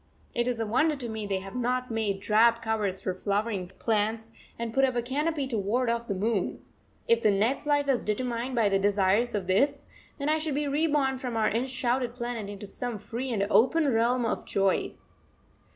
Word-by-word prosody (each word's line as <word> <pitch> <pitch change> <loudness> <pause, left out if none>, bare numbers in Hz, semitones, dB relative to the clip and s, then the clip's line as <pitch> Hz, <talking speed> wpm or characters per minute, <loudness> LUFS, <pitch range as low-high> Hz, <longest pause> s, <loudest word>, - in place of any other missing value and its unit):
It 240 0 0
is 245 -2 -1
a 225 - 0
wonder 300 +8 +2
to 255 -4 -6
me 220 -2 -4
they 195 -1 -1
have 195 0 -9
not 250 0 -1
made 210 -3 -1
drab 230 +3 +4
covers 215 -4 -1
for 185 - -2
flowering 200 0 -1
plants 225 +1 -1 0.3
and 230 -1 -4
put 270 - +3
up 260 -2 +2
a 240 - +1
canopy 290 +3 -1
to 230 -4 -1
ward 230 +5 +1
off 235 0 -3
the 200 - -2
moon. 205 0 -1 0.5
If 230 0 +4
the 215 - +4
next 220 +9 +1
life 290 -1 +2
is 265 -3 +1
determined 240 +3 -2
by 230 -3 +3
the 195 0 +2
desires 205 +4 +2
of 200 -3 -2
this, 275 +10 +1 0.3
then 280 - -3
I 310 +1 +2
should 310 -3 -2
be 295 0 0
reborn 285 -3 +1
from 245 -3 -3
our 220 - +2
enshrouded 245 +1 -1
planet 240 -4 -4
into 205 0 -7
some 240 +3 -4
free 240 +6 -5
and 200 -4 +1
open 280 +3 +4
realm 235 +2 +2
of 225 - -2
joy. 195 -1 +1
235 Hz, 200 wpm, -28 LUFS, 210-260 Hz, 0.5 s, drab